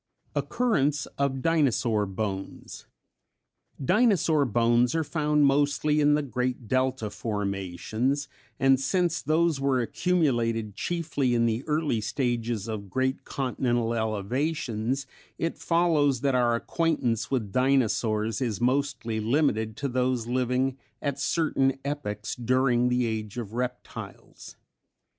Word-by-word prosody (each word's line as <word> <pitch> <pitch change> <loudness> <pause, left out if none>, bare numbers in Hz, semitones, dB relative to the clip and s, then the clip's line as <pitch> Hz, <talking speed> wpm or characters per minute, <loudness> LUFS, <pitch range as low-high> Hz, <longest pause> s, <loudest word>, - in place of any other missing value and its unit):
Occurrence 150 - +1
of 135 -2 0
Dinosaur 125 -10 +2
Bones. 95 0 -5 0.9
Dinosaur 180 - +3
bones 120 +2 +2
are 160 - +1
found 150 -1 +2
mostly 145 +2 +2
in 145 0 +5
the 150 - 0
great 125 -2 -3
delta 130 -3 0
formations, 105 +6 -2 0.3
and 135 -1 +4
since 175 +4 0
those 160 0 +2
were 135 -2 +2
accumulated 120 - 0
chiefly 145 - -1
in 115 0 +3
the 115 +2 0
early 150 -7 0
stages 115 -2 -1
of 105 -3 -5
great 130 +6 -1
continental 120 -3 -1
elevations, 115 +3 -1 0.3
it 165 - -2
follows 155 -7 +2
that 140 -1 +1
our 120 -2 +3
acquaintance 120 -6 0
with 115 -7 -1
Dinosaurs 115 -3 +1
is 115 -6 -1
mostly 125 -3 0
limited 110 -3 +1
to 140 - -2
those 125 -2 0
living 130 +2 0 0.2
at 140 0 -3
certain 140 -4 +1
epochs 110 -7 -3
during 125 0 +2
the 125 0 +1
Age 110 -1 -4
of 110 -3 -5
Reptiles. 125 +1 -6
130 Hz, 115 wpm, -27 LUFS, 115-145 Hz, 0.9 s, in